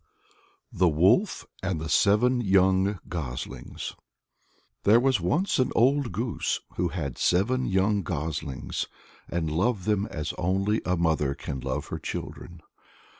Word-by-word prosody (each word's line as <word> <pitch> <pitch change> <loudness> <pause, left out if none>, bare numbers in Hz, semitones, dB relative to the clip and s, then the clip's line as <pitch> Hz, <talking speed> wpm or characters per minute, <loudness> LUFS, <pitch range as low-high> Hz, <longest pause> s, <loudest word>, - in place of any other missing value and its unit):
THE 90 -3 +3
WOLF 95 - +3 0.2
AND 95 -4 -1
The 80 - -4
Seven 115 +9 +3
Young 95 -1 +3
Goslings. 70 -8 -5 0.9
There 110 +4 +6
was 130 -5 +2
once 155 - +1
an 130 - +2
old 130 +1 +3
goose 115 +5 -1 0.2
who 90 - +1
had 80 -6 -4
seven 125 +9 +2
young 100 +2 +2
goslings, 75 -5 -3 0.4
and 80 -2 -1
loved 95 +4 0
them 105 -1 +1
as 75 -2 -4
only 95 +5 +1
a 90 0 +1
mother 80 -4 +1
can 65 - -5
love - - -3
her - - -4
children. 85 -2 -7
95 Hz, 130 wpm, -27 LUFS, 80-110 Hz, 0.9 s, There